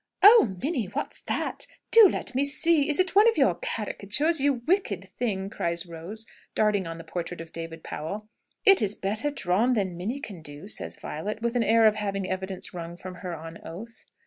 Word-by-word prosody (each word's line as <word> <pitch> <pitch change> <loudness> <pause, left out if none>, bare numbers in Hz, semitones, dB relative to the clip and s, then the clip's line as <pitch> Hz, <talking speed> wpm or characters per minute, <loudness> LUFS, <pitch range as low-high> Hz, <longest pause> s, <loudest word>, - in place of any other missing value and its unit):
"Oh, 410 - +8
Minnie, 270 - -1
what's 205 - -5
that? - - -2 0.2
Do 450 -4 +9
let - - -4
me 265 +2 +2
see! 305 +1 +3
Is 295 - +3
it 370 0 +2
one 420 +4 +7
of 455 - -2
your - - +4
caricatures, 275 - +1
you 275 -4 +1
wicked 205 - 0
thing?" 195 -6 -1
cries 170 -2 -3
Rose, 175 +7 -7 0.3
darting 205 -4 +2
on 165 0 -6
the 165 - -9
portrait 170 +1 -5
of 165 -1 -9
David 165 -1 -7
Powell. 200 +8 -6 0.4
"It's 220 - +5
better 215 +8 -1
drawn 230 -2 +1
than 195 -6 -1
Minnie 210 +11 -3
can 200 - -8
do," 145 +2 -10
says - - -3
Violet, 210 +8 -5
with 235 +1 -1
an 245 - +3
air 225 +1 +4
of 215 - +6
having 200 -2 -3
evidence 190 0 -4
wrung 170 -1 -7
from 185 +1 -8
her 180 -2 -4
on 165 +1 -9
oath. 225 +8 -10
205 Hz, 195 wpm, -26 LUFS, 175-265 Hz, 0.4 s, Do